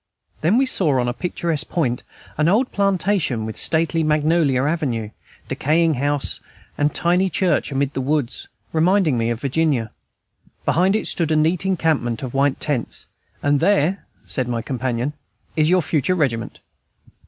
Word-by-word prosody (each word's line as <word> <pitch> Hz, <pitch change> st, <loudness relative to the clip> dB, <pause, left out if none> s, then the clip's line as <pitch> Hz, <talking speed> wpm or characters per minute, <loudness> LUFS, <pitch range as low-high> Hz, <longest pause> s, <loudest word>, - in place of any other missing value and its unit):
Then 175 Hz, +9 st, +3 dB
we 270 Hz, -, +4 dB
saw 165 Hz, -, +1 dB
on 120 Hz, -, 0 dB
a 120 Hz, -, -1 dB
picturesque 170 Hz, 0 st, -2 dB
point 125 Hz, -8 st, -1 dB, 0.3 s
an 155 Hz, +1 st, +1 dB
old 225 Hz, +9 st, +2 dB
plantation, 190 Hz, -, 0 dB
with 110 Hz, -, -5 dB
stately 165 Hz, 0 st, +2 dB
magnolia 155 Hz, -3 st, +2 dB
avenue, 135 Hz, -9 st, -1 dB, 0.4 s
decaying 160 Hz, +3 st, +2 dB
house, 145 Hz, +1 st, -1 dB, 0.4 s
and 145 Hz, 0 st, +1 dB
tiny 180 Hz, +4 st, +1 dB
church 175 Hz, -6 st, 0 dB
amid 140 Hz, 0 st, -1 dB
the 135 Hz, -, -2 dB
woods, 140 Hz, -2 st, -2 dB, 0.3 s
reminding 165 Hz, -2 st, +3 dB
me 115 Hz, -1 st, 0 dB
of 115 Hz, -1 st, -2 dB
Virginia; 140 Hz, -5 st, 0 dB, 0.7 s
behind 185 Hz, +4 st, +3 dB
it 220 Hz, -, -1 dB
stood 165 Hz, -3 st, -1 dB
a -, -, +3 dB
neat 165 Hz, +5 st, +1 dB
encampment 155 Hz, -10 st, 0 dB
of 125 Hz, -, -5 dB
white 135 Hz, 0 st, +1 dB
tents, 140 Hz, -6 st, -3 dB, 0.4 s
"and 145 Hz, 0 st, +3 dB
there," 195 Hz, 0 st, +1 dB, 0.2 s
said 130 Hz, -2 st, -2 dB
my 115 Hz, -2 st, -2 dB
companion, 125 Hz, +1 st, -2 dB, 0.4 s
"is 155 Hz, -1 st, +3 dB
your 180 Hz, -1 st, +3 dB
future 155 Hz, +4 st, 0 dB
regiment." 125 Hz, -9 st, -2 dB
150 Hz, 155 wpm, -21 LUFS, 130-170 Hz, 0.7 s, we